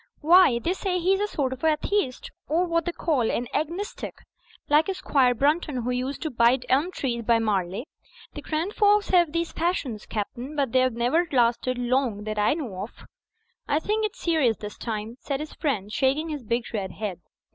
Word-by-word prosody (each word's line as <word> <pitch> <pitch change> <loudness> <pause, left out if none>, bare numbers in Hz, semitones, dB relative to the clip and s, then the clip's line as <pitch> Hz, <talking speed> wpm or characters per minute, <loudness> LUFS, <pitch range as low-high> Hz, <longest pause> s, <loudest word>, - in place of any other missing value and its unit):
"Why, 335 -5 +6
they 330 +10 -1
say 380 -1 -1
he's 375 +2 +2
a 415 - 0
sort 270 -9 -1
of 260 - -11
atheist, 310 -2 0 0.2
or 335 +5 +2
what 335 -1 0
they 345 - -1
call 285 -9 0
an 245 - -1
agnostic, 335 +7 -3 0.5
like 300 +4 +4
Squire 255 -7 +2
Brunton 290 -1 +1
who 250 - -1
used 255 +3 -3
to 315 - -2
bite 240 +2 +3
elm 285 +7 +3
trees 245 -8 -2
by 230 0 +3
Marley. 205 0 -1 0.5
The - - -7
grand 330 +6 -2
folks 415 -1 +3
have 345 -4 +4
these 335 +1 -1
fashions. 300 - -2
Captain, 240 +6 -5
but 275 -5 0
they've 255 +1 +3
never 245 +10 +1
lasted 245 0 +2
long 245 -4 0
that 215 0 -3
I 210 +7 +3
know 230 - -5
of." 210 - -9 0.6
"I 290 - +2
think 425 +7 0
it's 430 - -2
serious 305 -10 +2
this 210 -1 -7
time," 220 +1 -4
said 275 -2 -3
his 305 0 -6
friend, 215 - -2
shaking 280 +6 +1
his 300 -3 -4
big 235 +1 -1
red 190 -4 -3
head. 200 -4 -5
270 Hz, 190 wpm, -25 LUFS, 235-330 Hz, 0.6 s, Why